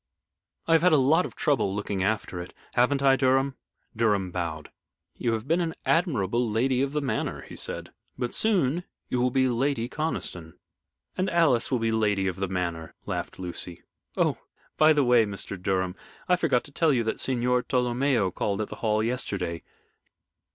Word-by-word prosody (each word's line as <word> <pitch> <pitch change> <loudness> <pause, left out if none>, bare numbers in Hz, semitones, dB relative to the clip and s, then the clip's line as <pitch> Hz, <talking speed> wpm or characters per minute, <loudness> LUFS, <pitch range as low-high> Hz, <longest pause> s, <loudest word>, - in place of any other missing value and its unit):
I 165 - +4
have 165 - +5
had 180 -1 +4
a - - +7
lot 155 +7 +3
of - - -15
trouble 120 -9 +1
looking 100 -2 -2
after 95 -3 -1
it. 90 - -10 0.2
Haven't 135 +3 +2
I, 135 -1 +6
Mr. - - -6
Durham?" 135 +1 +2 0.4
Durham 105 -5 +1
bowed. 85 -4 -4 0.4
"You 115 - -1
have 110 +2 -3
been 165 +3 +2
an 165 -1 -2
admirable 120 - +1
Lady 125 +4 +1
of 140 0 0
the 150 +1 -1
Manor," 135 - -2
he - - -11
said. - - -5 0.3
"But 120 - -3
soon 175 -7 +2 0.3
you 125 - 0
will 125 - +3
be 130 0 +2
Lady 125 -1 0
Conniston." 105 - -4 0.6
"And 185 +1 0
Alice 160 -9 +3
will 130 - +1
be 115 -1 0
Lady 105 -3 +1
of 95 -2 -2
the 95 0 -1
Manor," 85 -3 -3
laughed - - -4
Lucy. 90 -1 -6 0.3
"Oh, - - +1 0.4
by 155 0 +6
the 150 -2 +4
way, 120 -2 +5
Mr. 100 -1 -5
Durham, 95 0 -1 0.3
I 180 - +5
forgot 155 -9 +1
to 145 - -14
tell 160 +2 +2
you 125 -4 +2
that 110 - -2
Signor 125 -1 +1
Tolomeo 125 -4 +1
called 100 +1 -1
at 105 - -2
the - - -8
Hall 110 -1 +1
yesterday. 100 -8 -2
120 Hz, 185 wpm, -26 LUFS, 100-140 Hz, 0.6 s, a